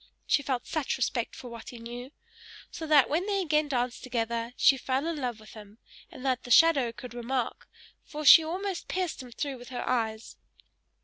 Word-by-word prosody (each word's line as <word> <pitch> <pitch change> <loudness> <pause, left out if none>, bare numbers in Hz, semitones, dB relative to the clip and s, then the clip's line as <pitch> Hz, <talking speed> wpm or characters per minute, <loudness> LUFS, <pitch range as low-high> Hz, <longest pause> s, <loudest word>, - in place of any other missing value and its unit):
She 285 - +2
felt 260 -3 -2
such 310 -5 -2
respect 240 -2 -1
for 250 - -9
what 230 -1 -9
he 245 - -9
knew! 240 +3 -8 0.6
So 320 - -6
that 295 -4 +6
when 340 +7 -1
they 400 -1 0
again 305 -4 +1
danced 245 -3 -2
together 235 -1 -2
she 275 - +6
fell 265 +2 -2
in 335 -1 -2
love 245 -5 -3
with 215 - -14
him; 210 -1 -13 0.3
and 260 - -11
that 255 -1 +1
the - - -11
shadow 275 -2 +5
could 240 +1 -10
remark, 240 +1 -3 0.3
for 305 -1 -7
she 320 +3 +10
almost 370 +3 -4
pierced 365 -6 -2
him 250 -1 -11
through 270 +1 -4
with 245 - -11
her 250 - -5
eyes. 225 -3 -2
255 Hz, 195 wpm, -28 LUFS, 235-300 Hz, 0.6 s, she